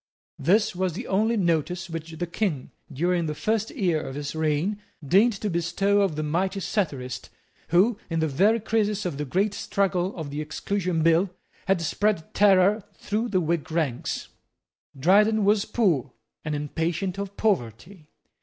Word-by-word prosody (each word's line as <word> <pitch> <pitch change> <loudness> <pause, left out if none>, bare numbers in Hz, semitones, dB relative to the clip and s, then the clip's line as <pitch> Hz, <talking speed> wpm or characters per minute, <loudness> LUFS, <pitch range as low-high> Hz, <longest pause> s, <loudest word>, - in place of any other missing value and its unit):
This 190 +8 +2
was 185 -1 -1
the 230 +9 -6
only 220 +4 +1
notice 175 0 0
which 165 -1 -6
the 175 +2 -3
King, 170 -6 -2 0.2
during 170 +4 0
the 150 - -3
first 220 +5 0
year 175 -6 0
of 135 - -6
his 145 -1 -4
reign, 160 +7 0 0.3
deigned 205 - +5
to 205 +1 -4
bestow 190 +3 +1
on 190 -6 +1
the 155 - -2
mighty 185 +6 -1
satirist 145 - -3 0.4
who, 200 +6 +3
in 165 -1 -1
the 160 - +1
very 200 +11 +3
crisis 210 -2 0
of 155 -6 -3
the 150 - -2
great 195 +8 0
struggle 190 -2 -1
of 155 -4 -6
the 145 +1 -3
Exclusion 170 +2 -2
Bill, 165 +4 +4 0.4
had 190 -3 +2
spread 200 0 0
terror 200 +1 +4
through 220 +3 -2
the 185 - +2
Whig 165 -1 -1
ranks. 155 -7 -2 0.7
Dryden 210 +7 +4
was 205 0 +3
poor 155 - +1 0.3
and 155 -1 -2
impatient 165 +6 -2
of 200 0 -5
poverty. 165 - -2
180 Hz, 160 wpm, -25 LUFS, 160-205 Hz, 0.7 s, deigned